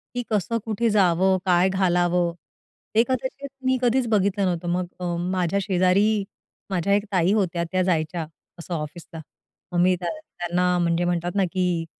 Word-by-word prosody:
की 245 - -1
कसं, 215 +1 0
कुठे 225 +1 0
जावं, 190 -2 +3
काय 180 0 +4
घालावं? 175 -2 +1 0.6
ते 225 - +6
कदाचित 260 +2 -3 0.2
मी 260 0 +3
कधीच 250 0 +2
बघितलं 200 -2 +2
नव्हतं. 175 -1 -2
मग 180 0 0
अ, 175 -1 -2 0.2
माझ्या 185 +1 0
शेजारी 195 +3 +2 0.5
माझ्या 190 +1 0
एक 200 0 +2
ताई 185 -1 +2
होत्या, 180 -5 0
त्या 185 0 +1
जायच्या 165 -2 -1 0.3
असं 170 +1 -6
ऑफिसला. 160 +1 -6 0.5
मग 175 - 0
मी 180 +1 +4
त्यां 175 - -2
त्यांना 180 - -1
म्हणजे 170 0 +1
म्हणतात 175 0 -1
ना, 200 - +3
की 180 -3 0
185 Hz, 160 wpm, -24 LUFS, 175-205 Hz, 0.6 s, ते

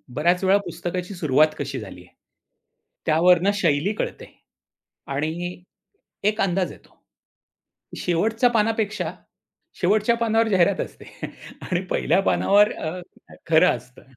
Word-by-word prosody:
बऱ्याच 175 +6 +2
वेळा 190 +1 +5
पुस्तकाची 180 +1 -5
सुरुवात 155 -2 +3
कशी 140 -1 -4
झाली 95 -4 -10
आहे? 90 - -20 0.9
त्यावरनं 175 +4 +4
शैली 170 +1 +1
कळते - - -4 0.9
आणि 170 +5 -3 0.7
एक 215 +1 -2
अंदाज 185 -1 0
येतो - - -16 1.0
की - - -7
शेवटच्या 220 +8 +2
पानापेक्षा 220 -1 0 0.7
शेवटच्या 215 +5 +3
पानावर 225 -1 +2
जाहिरात 190 0 +3
असते - - -9 0.6
आणि 180 0 -2
पहिल्या 195 - +2
पानावर 205 +1 +3
अ, 165 +3 -5 0.5
खरं 160 -5 +5
असतं 125 +2 -17
180 Hz, 115 wpm, -23 LUFS, 160-210 Hz, 1.0 s, वेळा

